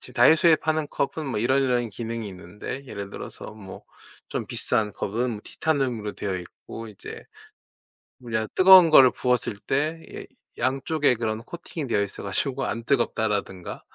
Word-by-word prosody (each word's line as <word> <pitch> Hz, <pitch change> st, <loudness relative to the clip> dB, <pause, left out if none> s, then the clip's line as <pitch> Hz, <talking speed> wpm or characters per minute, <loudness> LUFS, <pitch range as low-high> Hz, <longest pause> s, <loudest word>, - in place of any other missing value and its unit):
지금 125 Hz, -, -13 dB
다이소에 160 Hz, +6 st, +6 dB
파는 155 Hz, -1 st, -1 dB
컵은 140 Hz, +2 st, -2 dB
뭐 125 Hz, -, -2 dB
이런 130 Hz, +3 st, +2 dB
이런 125 Hz, -2 st, +1 dB
기능이 115 Hz, 0 st, -5 dB
있는데, 95 Hz, +9 st, -8 dB
예를 100 Hz, -4 st, -7 dB
들어서 -, -, -9 dB
뭐 105 Hz, -3 st, -11 dB, 0.5 s
좀 -, -, -3 dB
비싼 105 Hz, -2 st, -1 dB
컵은 115 Hz, +1 st, -2 dB
티타늄으로 125 Hz, -9 st, -1 dB
되어 95 Hz, -2 st, -3 dB
있고 100 Hz, +5 st, -10 dB
이제 105 Hz, -, -10 dB, 1.1 s
우리가 110 Hz, -1 st, -1 dB
뜨거운 185 Hz, -2 st, +9 dB
거를 130 Hz, -4 st, +8 dB
부었을 125 Hz, -4 st, 0 dB
때 155 Hz, +7 st, -1 dB
이 -, -, -8 dB, 0.3 s
양쪽에 135 Hz, +1 st, +1 dB
그런 110 Hz, -1 st, -2 dB
코팅이 160 Hz, +1 st, -7 dB
되어 105 Hz, -3 st, +1 dB
있어 100 Hz, -, -7 dB
가지고 130 Hz, +7 st, -2 dB
안 115 Hz, -, -3 dB
뜨겁다라든가 105 Hz, -8 st, -1 dB
120 Hz, 335 characters per minute, -25 LUFS, 105-140 Hz, 1.1 s, 뜨거운